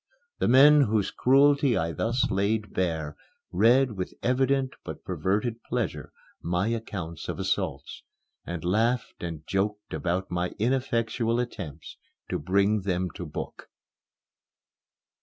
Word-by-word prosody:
The - - +1
men 145 +4 +7
whose 110 -6 +1
cruelty 140 0 +4
I 80 +1 0
thus 120 - 0
laid 105 +2 0
bare 80 -5 -1 0.4
read 120 +7 +4
with 95 -3 -5
evident 130 +1 +1
but - - -8
perverted 110 +5 -1
pleasure 120 -5 -3 0.3
my 90 +5 0
accounts 100 -8 -5
of - - -3
assaults, - - -2 0.4
and 85 -1 -5
laughed 115 +6 0
and 80 -3 -6
joked 105 +2 -2
about 90 +1 -2
my 90 0 -2
ineffectual 115 -1 0
attempts 100 - -6 0.3
to - - -1
bring 100 +6 +2
them 90 -1 -1
to 90 - -7
book. 75 - -7
105 Hz, 120 wpm, -27 LUFS, 90-120 Hz, 0.4 s, men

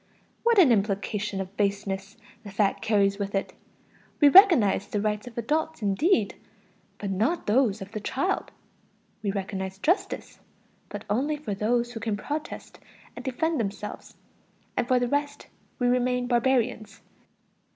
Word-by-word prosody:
What 470 -1 +3
an 335 -10 +7
implication 200 -1 0
of 190 +1 -6
baseness 200 0 -2 0.2
the 210 - -10
fact 200 0 0
carries 200 -2 +2
with 200 0 -3
it: 195 - -2 0.7
we 290 - +7
recognize 285 - +6
the 205 - -2
rights 210 +2 -2
of 245 - -11
adults 305 +3 -1
indeed, 210 - +2 0.6
but 200 -2 -4
not 225 - 0
those 220 -3 +2
of 195 - -13
the 215 - -4
child! 280 - -1 0.7
We 210 - -2
recognize 190 -1 -4
justice, 345 - -1 0.5
but - - -7
only 275 +9 0
for 255 -9 -4
those 235 +4 0
who 225 - -5
can 220 -2 -2
protest 295 +8 -6 0.4
and - - -8
defend 315 +4 -1
themselves; 210 -1 -5 0.6
and 240 - 0
for 255 - +3
the 245 0 +1
rest, 285 +2 -2 0.3
we 245 - -1
remain 250 0 +1
barbarians. 240 -3 0
220 Hz, 145 wpm, -26 LUFS, 200-265 Hz, 0.7 s, an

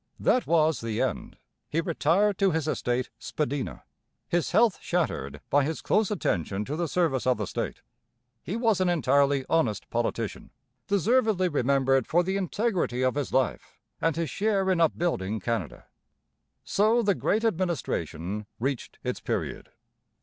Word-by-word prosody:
That 250 - +2
was 160 -4 +3
the 115 -2 -3
end. - - -2 0.3
He 160 - 0
retired 175 +4 +2
to 195 - +4
his 160 -3 -1
estate 125 -4 -1
'Spadina,' 145 -3 -3 0.4
his 175 -1 0
health 220 +2 +3
shattered 175 -1 -2
by 145 0 +4
his 160 +3 -2
close 215 -2 +2
attention 100 - -1
to 145 - -3
the 170 +1 -1
service 155 -7 0
of 125 - +3
the 105 - -2
state. - - -4 0.6
He 190 - -4
was 225 -5 +2
an 185 - +3
entirely 140 -4 +2
honest 120 -11 +1
politician, 115 -2 -2 0.4
deservedly 205 -1 +2
remembered 135 -2 +2
for 175 +2 +3
the 190 +2 -1
integrity 190 - 0
of 130 - +2
his 145 -1 -3
life 130 -1 -1 0.2
and 165 -1 +1
his 165 -4 -2
share 195 -2 +1
in 175 -2 +2
upbuilding 145 - 0
Canada. 115 +3 -3 0.8
So 220 +4 +2
the 200 -1 +3
Great 215 +4 0
Administration 105 - -2
reached 135 +1 -3
its - - -2
period. - - -3
160 Hz, 150 wpm, -27 LUFS, 130-190 Hz, 0.8 s, to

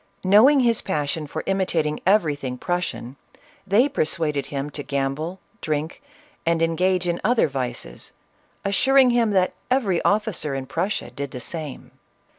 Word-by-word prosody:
Knowing 225 +9 +6
his 235 -2 +2
passion 150 -2 -2
for 155 +2 -5
imitating 170 -6 0
everything 145 -10 +1
Prussian, 160 -6 -3 0.5
they 215 +8 +4
persuaded 155 - -1
him 140 +1 -4
to 145 - -4
gamble, 140 +6 -3 0.2
drink 155 - -3 0.4
and 165 0 +1
engage 180 +2 +1
in 175 0 -1
other 235 -1 +3
vices, 125 - -5 0.5
assuring 255 +6 +4
him 235 -2 +2
that 185 -3 +2 0.2
every 220 -9 +1
officer 200 -9 0
in 135 -1 -4
Prussia 170 +9 -2
did 140 0 -5
the 125 - -7
same. 155 +2 -6
170 Hz, 135 wpm, -23 LUFS, 145-200 Hz, 0.5 s, Knowing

